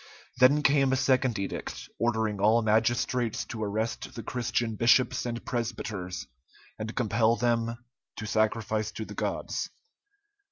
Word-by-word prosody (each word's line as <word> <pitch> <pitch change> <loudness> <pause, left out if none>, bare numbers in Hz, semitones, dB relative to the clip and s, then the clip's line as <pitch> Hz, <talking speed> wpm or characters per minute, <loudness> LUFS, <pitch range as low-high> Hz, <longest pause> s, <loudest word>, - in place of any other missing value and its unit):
Then 140 +4 +6
came 140 -2 +4
a - - +3
second 130 -3 +2
edict, 100 0 -5
ordering 110 -3 0
all 110 +3 +4
magistrates 115 +2 +1
to 110 -3 -5
arrest 110 +2 -3
the 115 - -6
Christian 120 -1 -1
bishops 120 +3 +3
and 120 0 -4
presbyters, 110 -6 -3 0.5
and 110 +1 -5
compel 115 -1 +2
them 115 -1 0 0.4
to 105 - -6
sacrifice 110 0 0
to 110 - -5
the - - -9
gods. - - -2
115 Hz, 130 wpm, -28 LUFS, 110-120 Hz, 0.5 s, Then